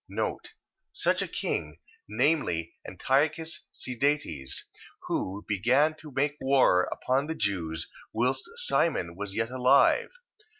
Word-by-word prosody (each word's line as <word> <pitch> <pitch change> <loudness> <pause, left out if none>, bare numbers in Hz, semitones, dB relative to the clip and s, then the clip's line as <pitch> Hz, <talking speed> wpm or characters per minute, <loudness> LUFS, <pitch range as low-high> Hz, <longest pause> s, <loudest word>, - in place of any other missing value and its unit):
Such - - +1
a - - -2
king... 75 +2 -3 0.3
Viz., 115 - +1 0.2
Antiochus 150 - 0
Sidetes, 125 - -1 0.4
who 100 +2 -3
began 125 +10 +3
to 155 -1 -12
make 145 +2 0
war 130 -9 +4
upon 135 +3 -1
the 160 - -3
Jews, 80 - -2 0.2
whilst 125 +4 -1
Simon 165 - +2
was 100 +1 -5
yet 115 +2 -1
alive. 130 +2 +4
125 Hz, 110 wpm, -28 LUFS, 95-145 Hz, 0.4 s, war